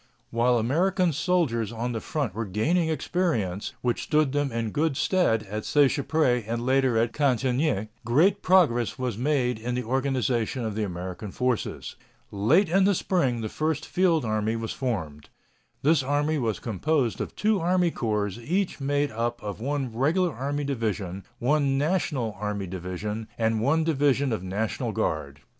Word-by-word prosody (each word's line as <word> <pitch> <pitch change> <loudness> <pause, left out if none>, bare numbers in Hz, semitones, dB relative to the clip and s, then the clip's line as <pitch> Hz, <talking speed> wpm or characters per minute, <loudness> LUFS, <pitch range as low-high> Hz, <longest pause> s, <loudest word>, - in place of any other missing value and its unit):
While 120 +1 +3
American 170 - +1
soldiers 140 - 0
on 120 +2 -3
the 115 -2 -3
front 140 - -2
were 110 +1 -3
gaining 160 - +1
experience, 140 - -1
which 120 -1 0
stood 150 -3 +2
them 145 -1 0
in 115 -2 -2
good 150 0 0
stead 175 - +2
at 105 +1 -5
Seicheprey 140 -3 +2
and 115 +1 -2
later 130 -2 +3
at 115 +1 +1
Cantigny, 130 -4 +1
great 145 - +3
progress 145 - +3
was 125 -4 -2
made 125 -1 0
in 120 +2 -3
the 125 - -1
organization 130 -1 0
of 110 - -2
the 110 - -2
American 90 +1 -5
forces. 125 +3 -2 0.3
Late 140 - +3
in 190 +4 +3
the 200 0 +3
spring 135 -11 0
the 110 - -2
first 155 +5 -2
field 175 -7 +2
army 110 0 0
was 115 -1 -3
formed. 85 - -4 0.5
This 155 +1 +4
army 145 +3 0
was 115 -4 -1
composed 120 - 0
of - - -5
two 215 -1 +2
army 175 0 +2
corps 105 -6 -1
each 175 +11 -1
made 145 +1 0
up 115 +1 -3
of 105 -1 -5
one 135 -3 -2
Regular 165 +7 +2
Army 140 +4 -2
division, 105 -8 -3
one 140 +2 +2
National 145 - 0
Army 105 -2 -2
division, 95 +4 -5
and 110 -1 +1
one 150 +7 +2
division 140 -4 +2
of 110 - -2
National 100 +2 -2
Guard. 70 -2 -2
125 Hz, 160 wpm, -26 LUFS, 110-150 Hz, 0.5 s, This